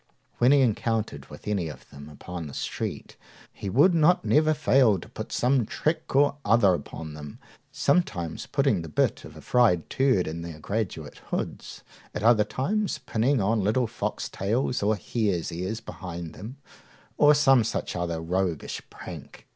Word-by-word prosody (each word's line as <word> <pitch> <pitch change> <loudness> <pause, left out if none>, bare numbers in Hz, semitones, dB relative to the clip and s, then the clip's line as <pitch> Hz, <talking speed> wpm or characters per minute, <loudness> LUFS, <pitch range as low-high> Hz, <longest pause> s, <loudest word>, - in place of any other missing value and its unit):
When 125 +2 +5
he 140 -1 +6
encountered 115 -2 -1
with - - -12
any 100 -5 0
of 75 - -10
them 70 +1 -11
upon 85 +2 -7
the 70 - -9
street, - - -5 0.4
he 100 - -6
would 145 - +5
not 170 +2 +3
never 155 +1 +3
fail 130 -8 +4
to - - -10
put - - -8
some 125 0 +2
trick 155 +7 -2
or 145 +1 +4
other 110 -5 +4
upon 80 -3 -6
them, 75 -1 -9 0.3
sometimes 105 - 0
putting - - +1
the 80 - -8
bit 75 - 0
of - - -12
a - - -10
fried 115 -10 +2
turd 130 -9 +2
in 80 +2 -5
their 85 -2 -7
graduate 95 -6 -4
hoods, - - -5 0.3
at - - -3
other 110 -2 +5
times 185 - -1
pinning 130 0 0
on 105 +1 +1
little 110 +5 +2
foxtails 115 +1 -2
or 105 +2 +2
hares' 100 -3 -1
ears 95 +6 -3
behind 85 -7 -7
them, 115 +8 -9 0.6
or 150 0 +7
some 135 -5 +5
such 110 - -3
other 85 -2 -2
roguish 85 -1 -2
prank. - - -10
110 Hz, 165 wpm, -26 LUFS, 85-130 Hz, 0.6 s, or